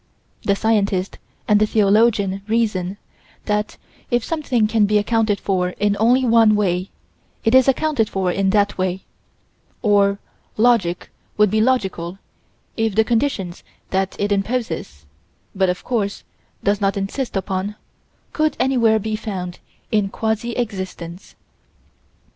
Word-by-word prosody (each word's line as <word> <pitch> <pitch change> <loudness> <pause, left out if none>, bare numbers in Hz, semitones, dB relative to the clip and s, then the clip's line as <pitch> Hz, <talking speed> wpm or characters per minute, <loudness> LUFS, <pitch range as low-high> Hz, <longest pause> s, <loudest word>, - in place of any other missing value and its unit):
The 200 - +1
scientist 200 -3 0 0.3
and 210 0 +4
the 215 - +3
theologian 205 -2 +2
reason 210 -4 0 0.5
that 210 0 -1 0.3
if 240 -1 +1
something 275 -8 0
can 215 -1 +2
be 210 +1 +3
accounted 215 0 +1
for 185 -2 0
in 205 0 +1
only 250 +4 +4
one 225 -2 +5
way, 185 -2 0 0.5
it 225 - +2
is 260 0 +6
accounted 270 -4 +1
for 190 -2 0
in 195 +1 +1
that 205 0 +1
way 185 0 -1 0.8
or 200 -2 +3 0.4
logic 215 -7 +2 0.3
would 210 -2 +4
be 215 - +2
logical, 190 -8 0 0.6
if 225 -3 0
the 220 - +5
conditions 225 -7 -1 0.3
that 190 0 0
it 205 0 -1
imposes, 195 - -2 0.5
but, 190 -1 +1
of 180 - -3
course, 210 -5 -2 0.4
does 200 +1 +1
not 200 0 +1
insist 210 +6 -3
upon, 195 +1 -3 0.6
could 310 -1 0
anywhere 240 -4 +3
be 215 0 -2
found 190 -5 -5 0.3
in 210 -2 +1
quasi 220 +3 -2
existence. 190 -6 -5
210 Hz, 130 wpm, -20 LUFS, 195-225 Hz, 0.8 s, is